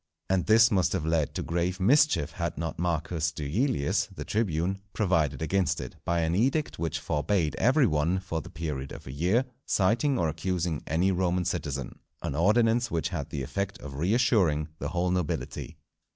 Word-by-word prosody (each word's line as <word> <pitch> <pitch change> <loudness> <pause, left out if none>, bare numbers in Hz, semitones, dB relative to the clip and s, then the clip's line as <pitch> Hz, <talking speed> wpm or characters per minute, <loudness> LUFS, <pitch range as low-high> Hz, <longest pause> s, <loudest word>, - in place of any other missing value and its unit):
And 95 -2 +1
this 115 +2 +6
must 95 -4 +2
have 80 - -1
led 80 -3 0
to - - -2
grave 85 +2 -1
mischief 125 - +3
had 85 -4 -3
not 80 +1 -4
Marcus 85 -1 -1
Duilius 75 - 0
the - - -8
tribune 95 -2 -1
provided 80 -8 +1
against 95 0 +1
it, - - -7
by 85 0 +1
an 80 0 0
edict 130 - +1
which 80 -1 -1
forbade 80 +2 0
every 135 +4 +4
one, 80 +1 +1
for 90 -4 -4
the 90 - -11
period 75 -6 -4
of - - -9
a 65 - -7
year, 90 - +1 0.2
citing 120 +8 +2
or 85 - +1
accusing 80 0 -2
any 90 +5 +2
Roman 90 -1 0
citizen, 75 -7 -3 0.2
an - - -2
ordinance 115 - +3
which 85 -3 -1
had 80 -7 -4
the 70 - -4
effect 100 +7 -3
of 75 - -8
reassuring 90 - +2
the - - -3
whole 90 0 0
nobility. 90 -4 -3
85 Hz, 175 wpm, -28 LUFS, 80-100 Hz, 0.2 s, this